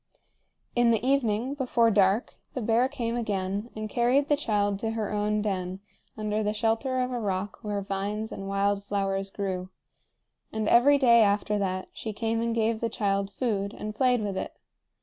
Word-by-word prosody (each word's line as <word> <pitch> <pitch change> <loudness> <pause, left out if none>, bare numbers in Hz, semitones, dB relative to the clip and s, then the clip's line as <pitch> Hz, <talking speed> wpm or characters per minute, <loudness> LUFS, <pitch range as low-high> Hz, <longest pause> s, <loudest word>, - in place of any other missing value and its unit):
In 240 -1 +4
the 225 0 +2
evening, 255 -2 +1
before 245 -4 +2
dark, 200 +2 +2 0.2
the 255 - -2
bear 235 +4 +3
came 240 -5 -3
again 205 -1 -2
and 215 0 -4
carried 250 +6 +2
the 295 - +5
child 205 -7 0
to 225 - -1
her 220 -2 -2
own 210 0 0
den 185 -2 -2 0.4
under 215 0 -1
the 210 0 0
shelter 230 +4 0
of 250 0 -1
a 245 - -2
rock 195 -2 -3
where 205 -1 -2
vines 200 +3 -3
and 195 - -6
wild 200 0 +1
flowers 195 -1 -1
grew; 190 -2 -4 0.8
and 220 -1 -2
every 275 +6 +6
day 235 -4 +6
after 205 0 +2
that 185 -1 -2
she 220 - -5
came 225 +1 -1
and 230 0 -1
gave 225 0 +1
the 230 - -1
child 200 -2 0
food 200 -3 -2
and 215 0 -5
played 250 +1 +2
with 200 -2 -2
it. - - -5
215 Hz, 180 wpm, -27 LUFS, 200-235 Hz, 0.8 s, every